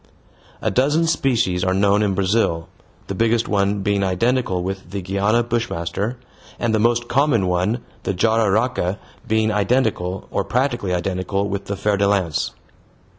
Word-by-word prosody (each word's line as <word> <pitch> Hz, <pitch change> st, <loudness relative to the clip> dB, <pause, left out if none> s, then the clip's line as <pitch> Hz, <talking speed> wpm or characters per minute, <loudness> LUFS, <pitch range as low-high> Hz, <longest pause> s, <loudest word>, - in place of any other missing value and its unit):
A -, -, +1 dB
dozen 150 Hz, +6 st, +2 dB
species 120 Hz, -, +1 dB
are 95 Hz, 0 st, +1 dB
known 100 Hz, +1 st, +3 dB
in 100 Hz, -2 st, +1 dB
Brazil, 95 Hz, -4 st, +1 dB, 0.4 s
the -, -, -4 dB
biggest 115 Hz, +3 st, +1 dB
one 100 Hz, -1 st, +1 dB
being 100 Hz, -1 st, +1 dB
identical 95 Hz, 0 st, 0 dB
with 95 Hz, -1 st, -5 dB
the 100 Hz, +2 st, -4 dB
Guiana 100 Hz, +5 st, +1 dB
bushmaster, 115 Hz, -1 st, -2 dB, 0.4 s
and 115 Hz, -2 st, 0 dB
the 110 Hz, -, +2 dB
most 120 Hz, +2 st, +2 dB
common 130 Hz, -7 st, +2 dB
one, 90 Hz, +6 st, 0 dB, 0.2 s
the -, -, -2 dB
jararaca, 110 Hz, -1 st, +1 dB, 0.3 s
being 110 Hz, -1 st, +2 dB
identical, 105 Hz, -4 st, 0 dB
or 100 Hz, -, 0 dB
practically 120 Hz, -2 st, -1 dB
identical 95 Hz, +2 st, -1 dB
with 100 Hz, 0 st, -4 dB
the 100 Hz, -, -4 dB
fer 105 Hz, +1 st, +1 dB
de 100 Hz, 0 st, +2 dB
lance. 95 Hz, -6 st, 0 dB
100 Hz, 150 wpm, -21 LUFS, 95-115 Hz, 0.4 s, known